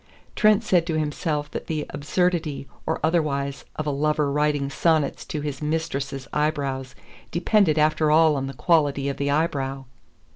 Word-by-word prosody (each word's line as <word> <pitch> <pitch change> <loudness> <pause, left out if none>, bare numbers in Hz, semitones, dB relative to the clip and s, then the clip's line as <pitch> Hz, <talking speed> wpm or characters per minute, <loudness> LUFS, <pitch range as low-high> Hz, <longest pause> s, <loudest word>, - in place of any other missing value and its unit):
Trent 215 0 +4
said 175 -5 +2
to 160 -2 0
himself 150 0 -2
that - - -6
the 155 -3 -2
absurdity 155 -1 -1 0.2
or - - 0
otherwise 145 -4 0
of 155 - -3
a 150 - 0
lover 150 0 +1
writing 145 -1 +1
sonnets 155 -1 +1
to 150 - -4
his 145 -1 -4
mistress's 140 -4 -3
eyebrow 145 -3 -1 0.4
depended 175 -2 +2
after 155 0 +3
all 155 0 +5
on 135 -1 -2
the 135 - -7
quality 145 -4 +2
of 140 - -4
the 140 0 -1
eyebrow. 135 -3 -1
150 Hz, 155 wpm, -24 LUFS, 140-160 Hz, 0.4 s, all